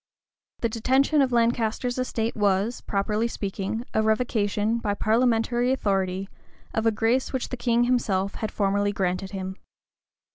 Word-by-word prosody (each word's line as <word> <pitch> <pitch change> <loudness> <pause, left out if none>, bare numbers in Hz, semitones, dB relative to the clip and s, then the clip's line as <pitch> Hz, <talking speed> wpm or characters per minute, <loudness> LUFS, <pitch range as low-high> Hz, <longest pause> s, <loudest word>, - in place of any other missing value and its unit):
The 230 - +2
detention 265 +6 +2
of 265 -2 +2
Lancaster's 235 +1 +1
estate 230 -2 -1
was, 205 +2 +1
properly 210 +3 0
speaking 205 +1 -4
a 220 - +3
revocation, 220 -1 +1
by 205 -3 -1
parliamentary 240 +2 +2
authority, 195 -6 0 0.5
of 220 0 +1
a - - +5
grace 225 +4 +1
which 260 -2 -3
the - - -3
King 240 -1 +2
himself 200 -6 +1
had 220 - -4
formerly 205 0 +1
granted 190 -1 -1
him. 190 -1 -5
220 Hz, 140 wpm, -25 LUFS, 200-240 Hz, 0.5 s, a